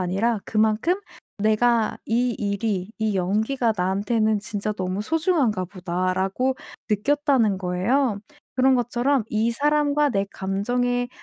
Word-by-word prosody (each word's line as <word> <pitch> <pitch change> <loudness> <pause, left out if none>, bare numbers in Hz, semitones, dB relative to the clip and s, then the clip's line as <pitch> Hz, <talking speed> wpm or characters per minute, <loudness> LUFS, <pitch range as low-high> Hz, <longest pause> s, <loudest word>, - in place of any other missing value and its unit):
아니라 200 +5 0
그만큼 220 +9 +2 0.5
'내가 220 +1 +2
이 245 +2 +1
일이 200 -2 -2
이 215 -2 0
연기가 220 +6 0
나한테는 205 +4 +1
진짜 215 -2 -2
너무 185 0 -3
소중한가 300 - +1
보다.'라고 185 +6 -1 0.4
느꼈다는 250 -2 +2
거예요. 200 +6 0 0.4
그런 260 0 +4
것처럼 245 +1 +1
이 220 +2 +1
사람과 295 +3 +2
내 200 -4 0
감정에 245 +6 -1
220 Hz, 275 characters per minute, -23 LUFS, 195-250 Hz, 0.5 s, 그런